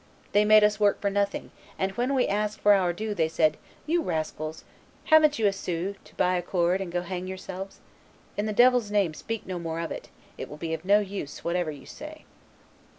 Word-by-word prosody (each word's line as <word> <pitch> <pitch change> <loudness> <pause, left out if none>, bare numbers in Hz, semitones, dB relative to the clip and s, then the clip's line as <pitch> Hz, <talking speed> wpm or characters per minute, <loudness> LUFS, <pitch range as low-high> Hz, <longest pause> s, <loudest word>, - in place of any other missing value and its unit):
They 210 +1 +4
made 215 0 +7
us 210 0 +3
work 205 -1 +3
for 200 - 0
nothing, 200 0 -1 0.3
and 190 0 0
when 245 +7 -1
we 255 - +2
asked 210 +1 -1
for 205 - +6
our 185 -3 +3
due 215 +4 -3
they 165 -5 +1
said, 155 -1 +2 0.3
'You 335 +3 +1
rascals, 155 - -3 0.4
haven't 310 -2 +5
ye 225 - +1
a 200 - +4
sou 185 0 -3
to - - -18
buy 180 0 +2
a - - -1
cord 175 +1 +1
and 185 -3 -5
go 175 0 -1
hang 180 0 -5
yourselves? 190 +1 -7 0.6
In 205 +1 -1
the - - -1
devil's 245 0 +4
name 200 -6 +1
speak 225 +7 -5
no 185 -2 -4
more 165 -1 -4
of 165 - -3
it; - - -7 0.3
it - - -5
will 150 - -9
be 160 +1 -2
no 205 +3 +5
use, 195 -7 -6
whatever 175 -1 0
you 145 -3 -8
say. 310 +1 -10
195 Hz, 215 wpm, -27 LUFS, 175-210 Hz, 0.6 s, made